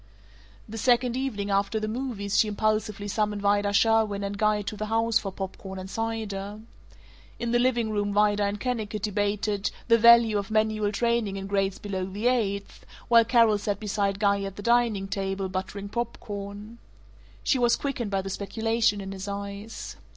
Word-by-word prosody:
The 225 Hz, +1 st, -6 dB
second 245 Hz, +1 st, +3 dB
evening 220 Hz, -7 st, -2 dB
after 200 Hz, +3 st, +1 dB
the 215 Hz, -, -3 dB
movies 215 Hz, -4 st, -2 dB
she 220 Hz, -, +4 dB
impulsively 215 Hz, -1 st, -1 dB
summoned 210 Hz, 0 st, -1 dB
Vida 205 Hz, 0 st, +2 dB
Sherwin 215 Hz, -1 st, +3 dB
and 200 Hz, 0 st, -3 dB
Guy 210 Hz, 0 st, +1 dB
to 200 Hz, -, -5 dB
the 215 Hz, +1 st, -4 dB
house 225 Hz, +1 st, +2 dB
for 195 Hz, -, -5 dB
pop 190 Hz, 0 st, -6 dB
corn 190 Hz, -1 st, -8 dB
and 185 Hz, 0 st, -6 dB
cider. 210 Hz, -2 st, -4 dB, 0.8 s
In 235 Hz, 0 st, -2 dB
the 240 Hz, -, +3 dB
living 240 Hz, -3 st, +1 dB
room 205 Hz, -1 st, 0 dB
Vida 205 Hz, 0 st, +3 dB
and 200 Hz, +1 st, -2 dB
Kennicott 220 Hz, -5 st, -3 dB
debated 205 Hz, 0 st, 0 dB, 0.2 s
"the 230 Hz, 0 st, +6 dB
value 235 Hz, -2 st, +7 dB
of 200 Hz, +2 st, -6 dB
manual 215 Hz, -1 st, +1 dB
training 235 Hz, -2 st, 0 dB
in 195 Hz, -, -5 dB
grades 195 Hz, -1 st, 0 dB
below 195 Hz, -2 st, -4 dB
the 205 Hz, +4 st, -5 dB
eighth," 205 Hz, -5 st, 0 dB, 0.3 s
while 230 Hz, -1 st, +7 dB
Carol 225 Hz, -3 st, +4 dB
sat 205 Hz, -1 st, -2 dB
beside 200 Hz, -2 st, -1 dB
Guy 200 Hz, -1 st, +2 dB
at 195 Hz, -1 st, -5 dB
the 205 Hz, -, -8 dB
dining 235 Hz, -4 st, +2 dB
table, 195 Hz, 0 st, -2 dB
buttering 190 Hz, +2 st, -5 dB
pop 235 Hz, +3 st, -3 dB
corn. 205 Hz, +2 st, -7 dB, 0.6 s
She 265 Hz, -, +2 dB
was 240 Hz, -1 st, +4 dB
quickened 250 Hz, -6 st, -3 dB
by 195 Hz, -1 st, -1 dB
the 195 Hz, -, -5 dB
speculation 220 Hz, +1 st, 0 dB
in 195 Hz, 0 st, -6 dB
his 195 Hz, 0 st, -6 dB
eyes. 200 Hz, +2 st, -6 dB
210 Hz, 180 wpm, -26 LUFS, 200-225 Hz, 0.8 s, value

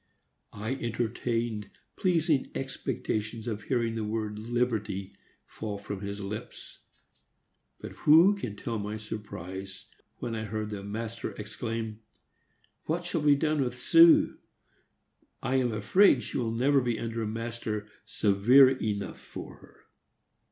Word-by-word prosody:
I 110 Hz, +5 st, -2 dB
entertained 115 Hz, -3 st, -2 dB, 0.3 s
pleasing 165 Hz, -6 st, +2 dB
expectations 115 Hz, -5 st, -3 dB
of 110 Hz, -3 st, -3 dB
hearing 115 Hz, -3 st, 0 dB
the 115 Hz, -1 st, -2 dB
word 105 Hz, -1 st, -3 dB
"liberty" 110 Hz, -4 st, -1 dB, 0.3 s
fall 105 Hz, -2 st, -5 dB
from 100 Hz, -1 st, -6 dB
his 100 Hz, 0 st, -5 dB
lips; 100 Hz, +1 st, -7 dB, 1.0 s
but -, -, -7 dB
who 165 Hz, +7 st, +6 dB
can 120 Hz, -, -5 dB
tell 115 Hz, +1 st, -3 dB
my 105 Hz, +1 st, -4 dB
surprise 95 Hz, -3 st, -7 dB, 0.3 s
when 120 Hz, -, -4 dB
I 110 Hz, -1 st, -3 dB
heard 110 Hz, 0 st, -4 dB
the 100 Hz, -2 st, -4 dB
master 110 Hz, +2 st, -5 dB
exclaim, 110 Hz, +1 st, -5 dB, 0.9 s
"What 170 Hz, +3 st, -1 dB
shall 170 Hz, -2 st, -1 dB
be 145 Hz, -1 st, +5 dB
done 150 Hz, 0 st, +1 dB
with 125 Hz, -1 st, -2 dB
Su? 165 Hz, +5 st, +6 dB, 1.0 s
I 135 Hz, -, +1 dB
am 125 Hz, -2 st, +1 dB
afraid 120 Hz, -, +4 dB
she -, -, -3 dB
will 115 Hz, -2 st, 0 dB
never 135 Hz, +4 st, +3 dB
be 120 Hz, -2 st, -1 dB
under 115 Hz, +1 st, -3 dB
a 110 Hz, -, -1 dB
master 110 Hz, -1 st, -4 dB, 0.2 s
severe 115 Hz, +7 st, +5 dB
enough 105 Hz, -6 st, -3 dB
for -, -, -9 dB
her." -, -, -20 dB
115 Hz, 130 wpm, -29 LUFS, 105-130 Hz, 1.0 s, who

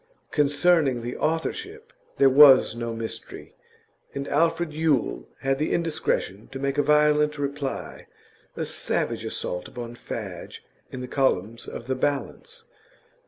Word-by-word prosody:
Concerning 145 Hz, -3 st, +2 dB
the 120 Hz, +1 st, -4 dB
authorship 405 Hz, -, -3 dB, 0.2 s
there 140 Hz, -, +4 dB
was 135 Hz, -3 st, +7 dB
no 115 Hz, 0 st, -4 dB
mystery, 115 Hz, 0 st, -6 dB, 0.6 s
and 140 Hz, 0 st, -4 dB
Alfred 165 Hz, +1 st, +1 dB
Yule 155 Hz, -5 st, 0 dB
had 135 Hz, 0 st, 0 dB
the 155 Hz, -, 0 dB
indiscretion 155 Hz, -, -1 dB
to 135 Hz, -, -6 dB
make 140 Hz, +1 st, -1 dB
a -, -, +6 dB
violent 150 Hz, 0 st, +3 dB
reply, 140 Hz, -1 st, -4 dB, 0.5 s
a -, -, -2 dB
savage -, -, -1 dB
assault 90 Hz, -, -4 dB
upon 120 Hz, -1 st, -7 dB
Fadge, 120 Hz, -, -7 dB, 0.3 s
in 130 Hz, -, -6 dB
the 125 Hz, -, -5 dB
columns 115 Hz, -5 st, 0 dB
of -, -, -7 dB
The 130 Hz, -, -1 dB
Balance. 145 Hz, -, -3 dB
140 Hz, 130 wpm, -25 LUFS, 125-155 Hz, 0.6 s, was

